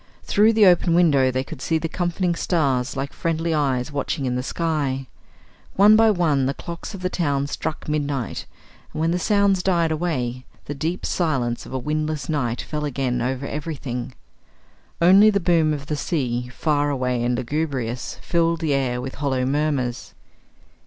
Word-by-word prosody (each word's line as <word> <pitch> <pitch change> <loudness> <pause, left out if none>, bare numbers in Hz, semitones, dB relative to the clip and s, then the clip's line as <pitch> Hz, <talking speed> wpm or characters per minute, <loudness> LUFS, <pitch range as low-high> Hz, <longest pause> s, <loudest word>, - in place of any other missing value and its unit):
Through 215 +2 +4
the 215 -2 +5
open 175 -2 +4
window 145 -7 +4
they 130 +1 -1
could 130 - -10
see 160 - +1
the 165 - -2
comforting 175 +1 -1
stars 140 -7 0
like 135 +1 -3
friendly 165 0 -1
eyes 135 -3 0
watching 140 0 -2
in 125 - 0
the 125 - -1
sky. 140 -3 -2 0.7
One 205 +2 +7
by 225 0 +5
one 155 -9 +2
the 135 - -2
clocks 170 +4 -7
of 185 - -9
the 185 - +1
town 140 -5 0
struck 155 +2 -4
midnight, 145 -5 -2 0.4
and - - -6
when 165 +1 +2
the 180 - 0
sounds 200 0 +2
died 170 -3 +1
away 130 -7 -2 0.2
the 145 - -4
deep 160 +5 -3
silence 130 -9 -1
of - - -11
a - - 0
windless 155 +3 -2
night 125 -6 -1
fell 150 -1 -4
again 130 -3 -1
over 130 +2 -2
everything. 140 -5 -5 0.8
Only 195 +5 +7
the 200 -2 +2
boom 165 -4 +2
of 145 -2 -3
the 150 - -2
sea, 125 -6 -2
far 145 +3 0
away 125 -3 -1
and 120 0 0
lugubrious, 130 -3 -3
filled 170 -1 +1
the 155 -3 +1
air 130 -3 0
with 130 +1 -5
hollow 130 -3 0
murmurs. 140 -3 -1
150 Hz, 175 wpm, -22 LUFS, 130-170 Hz, 0.8 s, One